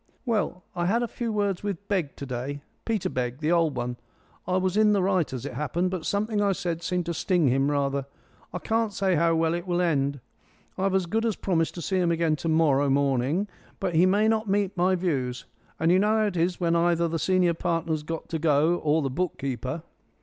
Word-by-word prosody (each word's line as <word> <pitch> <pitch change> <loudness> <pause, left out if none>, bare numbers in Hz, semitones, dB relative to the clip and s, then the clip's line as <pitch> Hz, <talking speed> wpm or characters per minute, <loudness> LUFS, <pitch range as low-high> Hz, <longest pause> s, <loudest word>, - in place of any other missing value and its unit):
"Well, 210 -6 -1
I 175 0 0
had 230 +5 +2
a - - -1
few 230 0 -4
words 205 -3 0
with 200 -1 -4
Begg 180 -9 -1
to 140 - -7
day 135 +3 -5 0.2
Peter 220 -5 0
Begg, 125 -1 -2
the 155 +2 -1
old 165 -5 +2
one. 120 0 -3 0.5
I 185 - +1
was 185 0 0
in 215 0 +4
the 195 -2 +2
right, 185 -4 +1
as 130 -3 -5
it - - -5
happened, 150 +7 -1
but 180 -4 -3
something 210 +1 0
I 200 -1 +2
said 175 -3 -3
seemed 180 0 -1
to 170 - -2
sting 170 -4 +2
him 135 +3 +2
rather. 140 -1 0 0.4
I 180 - -4
can't 225 +3 0
say 190 -2 +1
how 165 0 +2
it 175 +1 -4
will 175 -1 0
end. 140 -5 +1 0.6
I've 190 0 0
as 190 -2 +2
good 220 +6 -1
as 225 -3 0
promised 165 -4 0
to 170 - -6
see 190 - 0
him 175 -2 +2
again 165 -2 +1
to 165 - -3
morrow 145 -3 +3
morning, 140 +6 +1 0.3
but 185 -3 -1
he 170 +3 +5
may 205 +3 +3
not 220 -1 +1
meet 200 0 +1
my 185 +1 +2
views. 135 -9 -2 0.3
And 160 +1 +3
you 185 - +5
know 210 +2 +3
how 215 - +2
it 205 -3 -2
is 175 +1 0
when 170 -2 +1
either 170 0 +2
the 165 0 -2
senior 185 -1 +2
partner's 165 -2 -1
got 165 +2 -5
to 160 - -2
go 155 +2 +3
or 155 0 +1
the 135 - -1
book 180 +5 -2
keeper." 130 +3 -4
170 Hz, 225 wpm, -26 LUFS, 150-190 Hz, 0.6 s, he